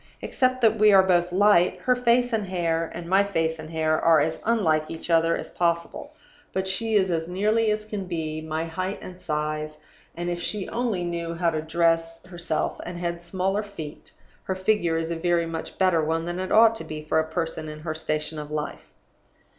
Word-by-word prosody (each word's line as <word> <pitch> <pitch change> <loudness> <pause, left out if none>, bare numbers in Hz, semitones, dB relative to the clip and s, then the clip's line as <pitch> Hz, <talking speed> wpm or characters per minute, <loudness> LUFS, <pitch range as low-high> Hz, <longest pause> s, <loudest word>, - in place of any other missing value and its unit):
Except 255 -1 0
that 225 -2 +4
we 215 0 +7
are 195 -1 +7
both 175 -1 +2
light, 185 -2 +4
her 250 - +3
face 245 0 +2
and 215 -3 0
hair 165 -3 -1
and 170 0 -6
my 190 +3 +4
face 165 -5 -1
and 155 0 -8
hair 155 -1 0
are 165 -2 +5
as 160 +1 -1
unlike 165 -9 +2
each 165 +1 -6
other 165 0 +3
as - - -7
possible. 170 -1 -2 0.4
But 190 0 -1
she 220 +4 -1
is 190 -3 +3
as 165 0 -1
nearly 215 +4 +2
as 215 0 -1
can 210 -3 -5
be 155 -3 -3
my 160 +1 -3
height 185 +4 -3
and 185 0 -10
size; 155 -2 -3 0.4
and 175 +1 -4
(if 175 0 -2
she 200 +2 -3
only 230 -7 -1
knew 170 -1 -3
how 170 0 +1
to 155 -1 -2
dress 165 +1 0
herself, 175 -3 -3
and 175 0 -6
had 170 0 -3
smaller 190 +3 -1
feet) 165 -8 -9 0.3
her 190 - -2
figure 185 -4 +1
is 165 0 -2
a - - -1
very 170 0 +1
much 165 -1 -6
better 185 -4 +3
one 165 +1 -1
than 175 +1 -4
it 185 0 -4
ought 225 +1 +7
to - - -6
be 155 0 -7
for 155 +1 +1
a 160 0 -1
person 165 -2 -3
in 155 0 -8
her 155 0 -3
station 155 0 -3
in 150 0 -7
life. 150 0 -5
170 Hz, 210 wpm, -25 LUFS, 160-190 Hz, 0.4 s, we